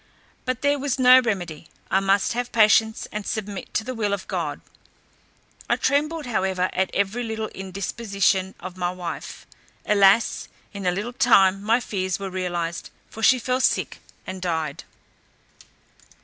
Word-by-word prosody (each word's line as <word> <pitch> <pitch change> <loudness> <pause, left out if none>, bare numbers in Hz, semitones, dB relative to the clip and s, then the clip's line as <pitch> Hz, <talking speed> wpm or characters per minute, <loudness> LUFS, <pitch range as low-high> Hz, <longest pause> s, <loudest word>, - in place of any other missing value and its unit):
But 255 -1 -3
there 285 0 +2
was 275 -1 -1
no 255 0 +8
remedy; 175 -10 -3 0.2
I 190 - +4
must 195 +2 +2
have 245 +1 -3
patience, 220 0 +3
and 210 0 -4
submit 205 -2 -5
to 220 - +1
the 255 +3 -5
will 210 -4 -1
of 200 - -4
God. - - -3 1.1
I - - +4
trembled 300 +2 0
however 190 -6 0
at 190 0 0
every 200 +4 -1
little 220 -2 -3
indisposition 195 0 -1
of 185 +1 -8
my 175 -1 0
wife. 180 -2 -7 0.4
Alas! 200 +2 +3 0.3
in 200 -2 -4
a - - +4
little 210 +7 -4
time 195 -6 +4
my 225 +4 +2
fears 190 -5 -2
were 195 -1 -6
realized, 175 -2 -3 0.2
for 225 - -9
she 255 +3 +6
fell 255 +1 -1
sick, - - +1 0.3
and 185 0 -6
died. 160 -5 -3
200 Hz, 150 wpm, -24 LUFS, 185-235 Hz, 1.1 s, no